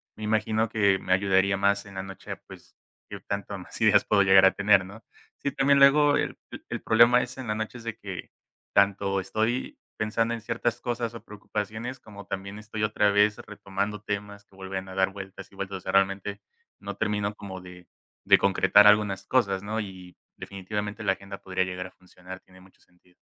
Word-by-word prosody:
me 110 Hz, -, -9 dB
imagino 110 Hz, +1 st, +1 dB
que 100 Hz, -3 st, +2 dB
me 90 Hz, -, 0 dB
ayudaría 95 Hz, 0 st, +2 dB
más 100 Hz, +1 st, +1 dB
en 100 Hz, -1 st, -13 dB
la 95 Hz, -, -4 dB
noche, 95 Hz, 0 st, -8 dB
pues, -, -, -14 dB, 0.3 s
que -, -, -7 dB
tanto 100 Hz, 0 st, -4 dB
más 90 Hz, -, -10 dB
ideas -, -, +5 dB
puedo 100 Hz, -2 st, +4 dB
llegar 95 Hz, 0 st, +7 dB
a 95 Hz, -, +6 dB
tener, 100 Hz, -2 st, +3 dB
¿no? 100 Hz, +4 st, -12 dB, 0.3 s
Sí, 140 Hz, -, -2 dB
también 140 Hz, +1 st, +3 dB
luego 145 Hz, +1 st, +6 dB
el -, -, -2 dB, 0.3 s
el -, -, -4 dB
problema 120 Hz, +2 st, +5 dB
es 125 Hz, +2 st, -6 dB
en 130 Hz, -3 st, -7 dB
la 105 Hz, -, -1 dB
noche, 110 Hz, +3 st, -4 dB
es 115 Hz, -, -12 dB
de 115 Hz, -3 st, -4 dB
que -, -, -8 dB, 0.4 s
tanto 100 Hz, 0 st, +2 dB
estoy 110 Hz, +6 st, -2 dB, 0.2 s
pensando 115 Hz, +2 st, 0 dB
en 115 Hz, -, -5 dB
ciertas 115 Hz, +1 st, -2 dB
cosas 120 Hz, -1 st, -3 dB
o 115 Hz, -, -10 dB
preocupaciones, 110 Hz, +4 st, -5 dB
como 100 Hz, -3 st, -12 dB
también 100 Hz, +1 st, -6 dB
estoy 105 Hz, 0 st, -5 dB
otra 105 Hz, -1 st, +2 dB
vez 105 Hz, +1 st, +3 dB
retomando 100 Hz, 0 st, -5 dB
temas 100 Hz, -1 st, -5 dB
que 100 Hz, -, -25 dB
vuelven 95 Hz, 0 st, -6 dB
a 95 Hz, -, -9 dB
dar 95 Hz, 0 st, +2 dB
vueltas 95 Hz, -1 st, -9 dB
y -, -, -18 dB
vueltas. 100 Hz, 0 st, -5 dB
O -, -, -12 dB
sea, 95 Hz, -, -4 dB
realmente 100 Hz, +1 st, +1 dB, 0.4 s
no -, -, -6 dB
termino 105 Hz, 0 st, -1 dB
como 95 Hz, -3 st, -8 dB
de 90 Hz, -1 st, -13 dB, 0.4 s
de -, -, +7 dB
concretar 100 Hz, +1 st, +5 dB
algunas 105 Hz, -2 st, +3 dB
cosas, 100 Hz, -7 st, +1 dB
¿no? 110 Hz, +2 st, -2 dB
Y 95 Hz, -3 st, -10 dB, 0.2 s
definitivamente 105 Hz, +3 st, -5 dB
la 95 Hz, -, +2 dB
agenda 100 Hz, 0 st, -7 dB
podría 95 Hz, -1 st, -1 dB
llegar 90 Hz, 0 st, -5 dB
a -, -, -17 dB
funcionar, 90 Hz, 0 st, -12 dB
tiene 95 Hz, 0 st, -20 dB
mucho 95 Hz, 0 st, -21 dB
sentido. 90 Hz, 0 st, -29 dB
100 Hz, 200 wpm, -26 LUFS, 95-110 Hz, 0.4 s, llegar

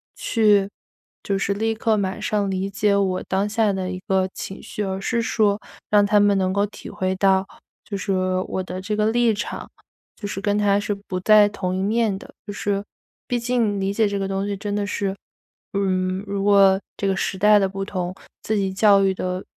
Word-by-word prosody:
去 210 Hz, -3 st, +2 dB, 0.5 s
就 195 Hz, -1 st, -1 dB
是 200 Hz, +1 st, 0 dB
立 225 Hz, +2 st, 0 dB
刻 220 Hz, 0 st, +1 dB
马 195 Hz, -2 st, -2 dB
上 205 Hz, -2 st, -1 dB
理 190 Hz, +1 st, -2 dB
解 205 Hz, +1 st, +1 dB
我 190 Hz, -2 st, 0 dB
当 195 Hz, +2 st, +1 dB
下 215 Hz, 0 st, +1 dB
的 190 Hz, -1 st, -3 dB
一 185 Hz, -, -5 dB
个 190 Hz, -1 st, +2 dB
情 195 Hz, -, -7 dB
绪， 210 Hz, -, -5 dB
而 190 Hz, -1 st, -3 dB
是 235 Hz, +4 st, -1 dB
说 210 Hz, -2 st, +1 dB, 0.3 s
让 205 Hz, -1 st, +5 dB
他 210 Hz, +1 st, +4 dB
们 205 Hz, -1 st, +4 dB
能 185 Hz, -1 st, +1 dB
够 200 Hz, +1 st, +1 dB
体 205 Hz, -, -10 dB
会 190 Hz, -2 st, -2 dB
到， 190 Hz, 0 st, +2 dB, 0.4 s
就 205 Hz, -, -5 dB
是 195 Hz, -, -3 dB, 0.4 s
我 190 Hz, -, -2 dB
的 185 Hz, 0 st, -6 dB
这 210 Hz, +2 st, -2 dB
个 210 Hz, -, +2 dB
立 240 Hz, -1 st, +3 dB
场， 210 Hz, -, -5 dB, 0.5 s
就 205 Hz, -, -5 dB
是 195 Hz, -1 st, -5 dB
跟 205 Hz, 0 st, +1 dB
他 205 Hz, -1 st, +3 dB
是 205 Hz, 0 st, -2 dB
不 200 Hz, -2 st, -6 dB
在 210 Hz, +1 st, +6 dB
同 185 Hz, -3 st, -3 dB
一 190 Hz, -, -1 dB
面 215 Hz, 0 st, +1 dB
的。 -, -, -14 dB
就 -, -, -6 dB
是 200 Hz, 0 st, -2 dB, 0.4 s
毕 245 Hz, -, 0 dB
竟 235 Hz, -4 st, 0 dB
理 195 Hz, +1 st, -1 dB
解 220 Hz, +1 st, +2 dB
这 200 Hz, 0 st, -2 dB
个 195 Hz, -, -2 dB
东 195 Hz, 0 st, -2 dB
西 200 Hz, -1 st, -3 dB
真 205 Hz, +1 st, -3 dB
的 205 Hz, -1 st, -1 dB
是 200 Hz, -1 st, -2 dB, 0.6 s
嗯， 185 Hz, -1 st, 0 dB
如 200 Hz, 0 st, -2 dB
果 195 Hz, -1 st, +5 dB, 0.2 s
这 200 Hz, -, -1 dB
个 195 Hz, -, +1 dB
时 190 Hz, -, -2 dB
代 210 Hz, +2 st, +6 dB
的 195 Hz, -1 st, +1 dB
不 195 Hz, 0 st, -4 dB
同， 185 Hz, -2 st, -3 dB, 0.3 s
自 220 Hz, -, 0 dB
己 195 Hz, -1 st, -1 dB
教 200 Hz, 0 st, +5 dB
育 195 Hz, -1 st, +2 dB
的 185 Hz, 0 st, -4 dB
200 Hz, 230 characters per minute, -22 LUFS, 190-210 Hz, 0.6 s, 在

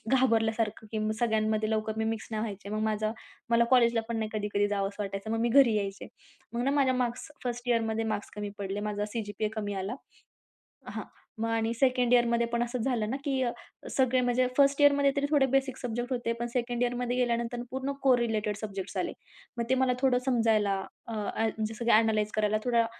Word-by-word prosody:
घाबरल्यासारखं 225 Hz, -3 st, +1 dB
की 220 Hz, -, -1 dB
मग 215 Hz, 0 st, 0 dB
सगळ्यांमध्ये 220 Hz, -2 st, +1 dB
लवकर 220 Hz, 0 st, -1 dB
मी 220 Hz, -, +1 dB
मिक्स 225 Hz, 0 st, -3 dB
नाही 215 Hz, -1 st, -2 dB
व्हायचे. 200 Hz, -2 st, -5 dB
मग 215 Hz, 0 st, -2 dB
माझा 215 Hz, 0 st, 0 dB, 0.4 s
मला 235 Hz, 0 st, +5 dB
कॉलेजला 235 Hz, -2 st, +5 dB
पण 230 Hz, -1 st, -2 dB
नाही 220 Hz, -1 st, -2 dB
कधी-कधी 205 Hz, -1 st, 0 dB
जावंस 200 Hz, -1 st, -2 dB
वाटायचं. 195 Hz, +1 st, -4 dB
मग 225 Hz, -, 0 dB
मी 235 Hz, -, +2 dB
घरी 250 Hz, -2 st, +6 dB
यायचे. 200 Hz, -1 st, -3 dB, 0.5 s
मग 240 Hz, +1 st, -1 dB
ना 275 Hz, -, +2 dB
माझ्या 275 Hz, -2 st, +3 dB
मार्क्स 250 Hz, +3 st, -2 dB
1st 245 Hz, 0 st, -3 dB
इयरमध्ये 225 Hz, -1 st, +1 dB
मार्क्स 205 Hz, -, -6 dB
कमी 205 Hz, -1 st, -4 dB
पडले. 200 Hz, 0 st, -3 dB
माझा 205 Hz, 0 st, -2 dB
सी.जी.पी.ए 215 Hz, -2 st, -2 dB
कमी 205 Hz, -2 st, -2 dB
आला. 205 Hz, +6 st, -3 dB, 0.9 s
हां, -, -, -5 dB, 0.4 s
मग 225 Hz, +1 st, -1 dB
आणि 225 Hz, 0 st, 0 dB
2nd 250 Hz, 0 st, +2 dB
इयरमध्ये 235 Hz, -1 st, +3 dB
पण 235 Hz, 0 st, 0 dB
असंच 240 Hz, 0 st, -3 dB
झालं 230 Hz, -5 st, 0 dB
ना, 265 Hz, -, -1 dB
की 270 Hz, -2 st, +1 dB, 0.5 s
सगळे 260 Hz, -1 st, +2 dB
म्हणजे 250 Hz, +1 st, +2 dB
1st 280 Hz, 0 st, +4 dB
इयरमध्ये 285 Hz, -1 st, +5 dB
तरी 280 Hz, -, +2 dB
थोडे 290 Hz, -3 st, +4 dB
बेसिक 270 Hz, -1 st, +1 dB
सब्जेक्ट 240 Hz, +1 st, -4 dB
होते. 240 Hz, -1 st, -1 dB
पण 240 Hz, -, -1 dB
2nd 240 Hz, -1 st, -1 dB
इयरमध्ये 245 Hz, 0 st, -1 dB
गेल्यानंतर 240 Hz, -1 st, 0 dB
पूर्ण 265 Hz, +1 st, -2 dB
कोरिलेटेड 230 Hz, -5 st, +2 dB
सब्जेक्ट्स 200 Hz, -3 st, -5 dB
आले. -, -, -1 dB, 0.5 s
मग 235 Hz, -, 0 dB
ते 260 Hz, -, +4 dB
मला 260 Hz, -1 st, +2 dB
थोडं 260 Hz, -2 st, +4 dB
समजायला 225 Hz, -5 st, +2 dB, 0.3 s
अ, 230 Hz, -, -5 dB
अ, 215 Hz, +1 st, -1 dB, 0.2 s
जसं 225 Hz, +2 st, -6 dB
की 235 Hz, -, +4 dB
अ‍ॅनलाईज 215 Hz, -1 st, +3 dB
करायला 215 Hz, 0 st, +2 dB
थोडा 235 Hz, -2 st, +3 dB
230 Hz, 195 wpm, -29 LUFS, 215-250 Hz, 0.9 s, घरी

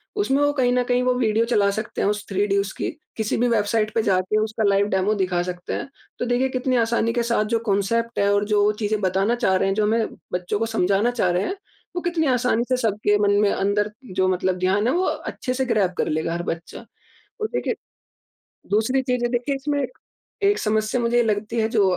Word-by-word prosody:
उसमें 290 Hz, -9 st, +1 dB
वो 290 Hz, -, +3 dB
कहीं 255 Hz, -3 st, +2 dB
न 250 Hz, 0 st, +2 dB
कहीं 245 Hz, 0 st, +1 dB
वो 250 Hz, 0 st, +2 dB
वीडियो 225 Hz, -2 st, +2 dB
चला 210 Hz, -4 st, +2 dB
सकते 215 Hz, +2 st, -4 dB
हैं, -, -, +2 dB
उस 210 Hz, 0 st, -2 dB
थ्री 200 Hz, +1 st, +1 dB
डी 200 Hz, 0 st, +1 dB
उसकी 200 Hz, -1 st, -2 dB, 0.3 s
किसी 220 Hz, -1 st, -1 dB
भी 245 Hz, -, +2 dB
वेबसाइट 215 Hz, -1 st, +1 dB
पे 225 Hz, -, +3 dB
जाके 185 Hz, +1 st, +1 dB
उसका 220 Hz, 0 st, -2 dB
लाइव 200 Hz, 0 st, +3 dB
डेमो 190 Hz, +3 st, +2 dB
दिखा 185 Hz, -3 st, 0 dB
सकते 180 Hz, 0 st, -5 dB
हैं। -, -, -4 dB, 0.3 s
तो -, -, -1 dB
देखिए 245 Hz, +2 st, +1 dB
कितनी 255 Hz, 0 st, -1 dB
आसानी 230 Hz, 0 st, +1 dB
के 240 Hz, -1 st, 0 dB
साथ 230 Hz, -2 st, +1 dB
जो -, -, +2 dB
कांसेप्ट 230 Hz, +4 st, 0 dB
है 200 Hz, -, +3 dB
और 205 Hz, 0 st, +2 dB
जो 210 Hz, 0 st, +3 dB
चीज़ें 215 Hz, -1 st, 0 dB
बताना 195 Hz, +5 st, +1 dB
चाह 210 Hz, -6 st, +1 dB
रहे 195 Hz, +1 st, +1 dB
हैं, 195 Hz, -, 0 dB
जो 215 Hz, -, +1 dB
हमें 220 Hz, +1 st, +1 dB, 0.3 s
बच्चों 180 Hz, +3 st, -1 dB
को 225 Hz, -, +1 dB
समझाना 215 Hz, +1 st, +1 dB
चाह 225 Hz, -7 st, +1 dB
रहे 180 Hz, +2 st, +1 dB
हैं, 380 Hz, -, -2 dB, 0.4 s
वो 355 Hz, -, -1 dB
कितनी 340 Hz, -3 st, 0 dB
आसानी 250 Hz, -2 st, +2 dB
से 255 Hz, -, +2 dB
सबके 210 Hz, -3 st, +1 dB
मन -, -, +4 dB
में 205 Hz, -, +3 dB
अंदर 205 Hz, +2 st, 0 dB, 0.2 s
जो 185 Hz, 0 st, +2 dB
मतलब 185 Hz, 0 st, 0 dB
ध्यान 195 Hz, +4 st, +1 dB
है 255 Hz, -, +2 dB
वो 365 Hz, +2 st, +1 dB
अच्छे 255 Hz, -, -3 dB
से 265 Hz, +1 st, -1 dB
ग्रैब 205 Hz, -7 st, +1 dB
कर -, -, 0 dB
लेगा 160 Hz, +2 st, -1 dB
हर 175 Hz, 0 st, -3 dB
बच्चा। 165 Hz, 0 st, -6 dB, 0.5 s
तो 435 Hz, -, -1 dB
देखिए, -, -, -2 dB, 0.9 s
दूसरी 220 Hz, +6 st, +2 dB
चीज़ 250 Hz, -2 st, -1 dB
है 240 Hz, -, +1 dB
देखिये 250 Hz, +3 st, -1 dB
इसमें 285 Hz, 0 st, -1 dB, 0.6 s
एक 405 Hz, +1 st, +3 dB
समस्या 215 Hz, +2 st, 0 dB
मुझे 235 Hz, 0 st, +1 dB
ये 240 Hz, -, +5 dB
लगती 215 Hz, 0 st, -1 dB
है 220 Hz, -, +1 dB
जो 220 Hz, -3 st, +3 dB
220 Hz, 225 wpm, -23 LUFS, 200-245 Hz, 0.9 s, ये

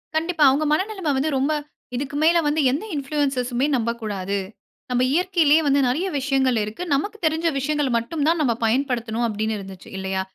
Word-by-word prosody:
கண்டிப்பா, 320 Hz, 0 st, +1 dB
அவங்க 285 Hz, +4 st, +1 dB
மன 305 Hz, -, +3 dB
நிலமை 375 Hz, -8 st, -2 dB
வந்து, 285 Hz, +4 st, 0 dB
ரொம்ப 275 Hz, +3 st, +1 dB, 0.4 s
இதுக்கு 275 Hz, +3 st, -4 dB
மேல 335 Hz, +2 st, +5 dB
வந்து 300 Hz, +1 st, +1 dB
எந்த 285 Hz, +9 st, -2 dB
இன்ஃப்ளூயன்ஸர் 275 Hz, -3 st, -1 dB
சுமே 250 Hz, +3 st, 0 dB
நம்பக்கூடாது. 215 Hz, -4 st, -2 dB, 0.5 s
நம்ம 250 Hz, 0 st, +1 dB
இயற்கையிலயே 330 Hz, -3 st, +3 dB
வந்து 280 Hz, 0 st, +3 dB
நிறைய 310 Hz, +10 st, 0 dB
விஷயங்கள் 265 Hz, -2 st, +1 dB
இருக்கு. 215 Hz, +11 st, -5 dB
நமக்கு 410 Hz, +10 st, -1 dB
தெரிஞ்ச 320 Hz, +1 st, +1 dB
விஷயங்கள் 295 Hz, 0 st, 0 dB
மட்டும் 285 Hz, +7 st, -3 dB
தான் 335 Hz, +1 st, +2 dB
நம்ம 250 Hz, -6 st, +2 dB
பயன்படுத்தனும், 240 Hz, -1 st, 0 dB
அப்டின்னு 220 Hz, 0 st, -2 dB
இருந்துச்சு 195 Hz, -2 st, -10 dB
இல்லையா? 190 Hz, 0 st, -2 dB
275 Hz, 170 wpm, -22 LUFS, 235-310 Hz, 0.5 s, மேல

